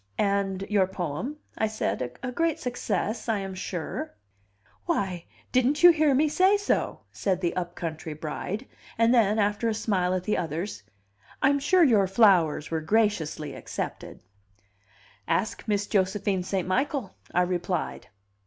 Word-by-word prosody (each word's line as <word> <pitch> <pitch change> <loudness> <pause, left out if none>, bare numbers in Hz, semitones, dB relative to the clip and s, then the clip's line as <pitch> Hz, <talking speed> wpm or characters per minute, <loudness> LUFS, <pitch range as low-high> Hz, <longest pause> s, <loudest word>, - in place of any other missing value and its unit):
"And 200 -1 0
your 200 -3 +3
poem?" 185 - -4 0.2
I 220 - +2
said. 170 - -3
"A 255 - -2
great 330 +3 0
success, 240 -2 -2
I 220 - +2
am 195 -1 -4
sure?" 175 - -5 0.7
"Why, 190 - -1 0.3
didn't 265 +5 +2
you 350 - +11
hear 310 -4 +3
me 300 +4 +3
say 375 +6 +4
so?" 405 - -1
said 190 -3 -1
the 175 -2 -1
upcountry 165 -3 -4
bride; 180 - -4 0.3
and 230 +1 +4
then, 215 -3 +4
after 210 +2 +1
a 220 - -1
smile 190 -4 0
at 185 - -2
the 210 - 0
others, 165 - -3 0.6
"I'm 280 +1 +4
sure 350 +6 +4
your 215 -9 +4
flowers 185 -7 +3
were 160 -1 -1
graciously 160 -6 0
accepted." - - -6 1.1
"Ask 220 - -1
Miss 205 -1 +1
Josephine 195 -1 0
St. 185 0 -2
Michael," 255 +1 -1 0.2
I 180 - +3
replied. 180 -1 -2
200 Hz, 145 wpm, -27 LUFS, 180-240 Hz, 1.1 s, you